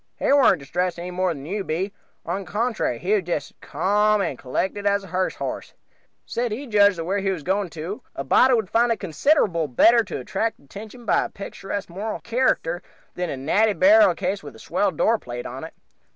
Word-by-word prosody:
He - - +2
warn't 275 -9 +5
distressed 175 +5 -2
any 175 +1 -6
more 185 0 0
than 140 -4 -7
you 200 +5 -3
be 190 +4 -2 0.3
on 175 +3 -2
the 190 -4 -10
contrary, 215 - -1 0.2
just 165 -5 -3
as - - -36
ca,'m 210 +6 +2
and 195 - -1
collected 190 +11 -2
as 200 0 +2
a - - -10
hearse 185 +2 -1
horse; - - -5 0.5
said 240 -1 -2
he 250 +7 -4
judged 205 -5 +4
that 165 - -4
wher' 195 +3 0
he 195 0 -1
was 180 -6 -3
going 190 +2 0
to 165 +6 -6
a 135 - -3
body 255 - +5
would 220 -4 0
find 235 +1 +3
it 230 - 0
considerable 180 - +1
better 230 - +5
to - - -5
attract 225 0 -2
attention 215 - -11
by - - +2
a - - -6
picturesque 200 0 -6
moral 210 +5 -4
character 230 -8 0 0.3
than 180 -1 -3
a 135 - -4
natty 205 +11 +2
burial 310 +6 +6
case 195 +1 -2
with 145 -5 -10
a - - -14
swell 180 - 0
door 220 +6 +1
plate 120 0 -7
on 130 +4 -7
it. 160 - -9
195 Hz, 210 wpm, -23 LUFS, 165-220 Hz, 0.5 s, burial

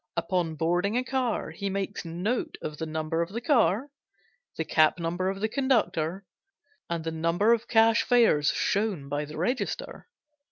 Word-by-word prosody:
Upon 175 -4 -1
boarding 175 +7 0
a 250 - +1
car 255 -9 -1
he 195 +5 -4
makes 195 +1 -3
note 180 +9 -2
of 150 -1 -5
the 160 - -3
number 155 +1 -2
of 170 - -2
the 220 +4 -4
car, 240 - +2 0.7
the 160 - -1
cap 155 +1 +3
number 175 +2 -1
of 195 0 -4
the 220 - +2
conductor, 210 - 0 0.6
and 170 -1 -2
the 165 - -3
number 170 +7 +2
of 230 - -1
cash 225 0 +4
fares 230 - +4
shown 200 -9 -1
by 145 +1 -2
the 150 +1 -9
register. 250 - -3
185 Hz, 165 wpm, -27 LUFS, 160-225 Hz, 0.7 s, cash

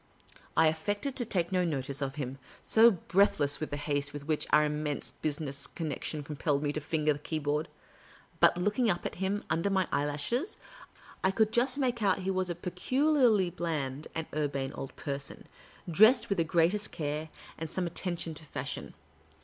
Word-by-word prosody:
I 160 - +6
affected 205 - 0
to 245 - +1
take 180 -6 0
no 185 -1 +2
notice 140 -4 -1
of 135 -1 -2
him, 135 -2 -4 0.2
so 225 +1 +7
breath 195 0 +2
less 145 0 +1
was 155 - -3
the 145 - -3
haste 145 -1 -1
with 145 -1 -7
which 155 0 0
our 150 0 +5
immense 150 -1 -2
business 145 -2 -3
connec 155 -5 -4
tion 150 -2 -3
compelled 145 0 -1
me 145 -1 0
to 155 - -3
finger 155 0 +1
the 145 - -8
keyboard; 150 0 -1 0.7
but, - - +5
looking 210 +6 +1
up 175 -3 0
at - - -2
him 200 +2 0
under 165 +5 +1
my 190 -2 +2
eyehishes, 150 - 0 0.7
I 190 - +4
could 215 +2 +2
just 250 +4 +1
make 250 -4 0
out 195 -3 +3
he 190 - 0
was 185 -1 0
a 175 - -2
peculiarly 220 - +2
bland 150 -5 -3
and 160 -1 -2
urbane 140 -3 -1
old 135 - -7
person, 140 -1 -4 0.4
dressed 220 - +6
with 200 -3 +1
the - - +4
greatest 175 +5 +2
care, 155 -1 -3 0.3
and 160 -1 -4
some 185 - -2
atten 175 +1 -3
tion 165 -1 -4
to 160 +1 -10
fashion. - - -5
160 Hz, 185 wpm, -30 LUFS, 145-195 Hz, 0.7 s, so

